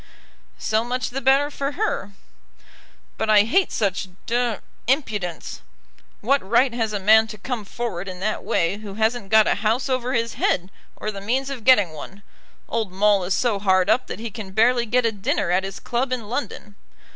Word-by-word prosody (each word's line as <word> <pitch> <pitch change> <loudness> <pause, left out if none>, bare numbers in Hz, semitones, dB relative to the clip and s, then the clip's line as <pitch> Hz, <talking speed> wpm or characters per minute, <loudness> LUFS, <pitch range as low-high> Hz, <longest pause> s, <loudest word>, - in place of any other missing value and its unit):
"So 220 +1 0
much 250 +1 -3
the 270 +2 -3
better 275 +3 +3
for 280 0 -3
her." 340 - -2 1.1
"But 220 - -1
I 210 -1 +7
hate 360 - +2
such 195 -2 -1 0.2
d 240 -1 0 0.3
impudence. 210 - -2 0.6
What 275 +6 +2
right 235 +5 +2
has 225 -2 -1
a 205 - -2
man 220 +3 +5
to 215 - -8
come 235 +1 -4
forward 195 -4 -5
in 185 -1 -7
that 215 +3 -2
way 170 +4 0
who 205 -2 -9
hasn't 220 -1 0
got 220 -1 +6
a - - +3
house 230 +5 0
over 255 0 -1
his 230 -1 0
head, 185 +2 0 0.2
or 215 - -4
the 200 -1 -8
means 260 +6 -1
of 255 -5 -6
getting 210 -10 +5
one? 190 +6 -10 0.4
Old 225 -4 -2
Maule 200 0 +3
is 185 - 0
so 230 -5 +1
hard 190 0 +3
up 255 - +1
that - - -5
he 225 0 -6
can 195 -3 -8
barely 235 +3 +3
get 245 +2 +2
a 230 - +2
dinner 195 -3 -1
at 185 +2 +2
his 195 0 -6
club 245 +2 -2
in 240 -4 -3
London. 235 -3 -5
220 Hz, 190 wpm, -23 LUFS, 200-245 Hz, 1.1 s, I